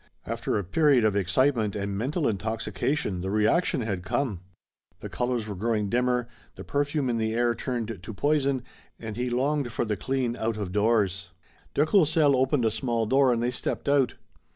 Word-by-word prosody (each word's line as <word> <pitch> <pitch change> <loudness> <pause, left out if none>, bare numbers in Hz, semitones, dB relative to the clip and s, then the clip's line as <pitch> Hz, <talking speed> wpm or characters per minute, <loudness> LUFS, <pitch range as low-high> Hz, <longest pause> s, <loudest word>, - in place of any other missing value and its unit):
After - - -2
a 100 - -1
period 135 - +3
of 105 -2 +2
excitement 110 +3 +1
and 100 -1 -3
mental 140 - -1
intoxication 105 0 -2
the 95 - -3
reaction 110 - +2
had 100 -5 -2
come. 105 0 -1 0.6
The - - -7
colors 120 -3 -2
were 105 - -4
growing 105 +1 -1
dimmer, 125 +1 +1 0.3
the - - -8
perfume 145 -1 -1
in 120 -2 0
the 110 0 -1
air 120 0 +2
turned 115 -5 -4
to 95 - -7
poison, 140 +3 +1 0.4
and 110 -2 -6
he 125 +2 -2
longed 135 +1 0
for 115 - -1
the 105 -1 -1
clean 125 +2 -1
out 110 -2 -2
of 100 -4 -4
doors. 100 -3 +1 0.5
De 145 - +4
Courcelles 155 -5 +4
opened 130 -1 +2
a 110 - +2
small 115 -1 -1
door 135 +3 +4
and 120 -1 0
they 120 - +1
stepped 125 - -3
out. 140 -3 +3
120 Hz, 180 wpm, -26 LUFS, 105-135 Hz, 0.6 s, De